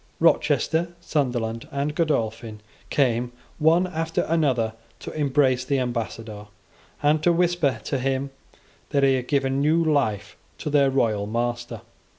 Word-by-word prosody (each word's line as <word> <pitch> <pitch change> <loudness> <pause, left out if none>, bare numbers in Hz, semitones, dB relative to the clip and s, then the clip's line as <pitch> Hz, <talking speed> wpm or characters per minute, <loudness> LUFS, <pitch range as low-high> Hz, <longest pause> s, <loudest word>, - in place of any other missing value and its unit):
Rochester, 170 +2 +2
Sunderland, 120 -8 -2
and 140 +2 -2
Godolphin 115 -9 -1 0.3
came, 120 -3 +1 0.3
one 165 +4 +4
after 165 -2 -2
another, 130 -9 +1 0.2
to - - -8
embrace 140 -3 +2
the 140 - 0
ambassador, 115 -4 -4 0.6
and 150 +1 +3
to 175 - +4
whisper 170 -7 +1
to 135 - -2
him 135 +1 -1 0.6
that 140 -1 +1
he 135 -1 +5
had 125 -1 -2
given 135 -1 +1
new 160 +3 +3
life 130 -10 0 0.2
to 150 - -4
their 140 -2 +4
royal 110 -6 +1
master. 120 +2 -3
135 Hz, 135 wpm, -24 LUFS, 120-150 Hz, 0.6 s, he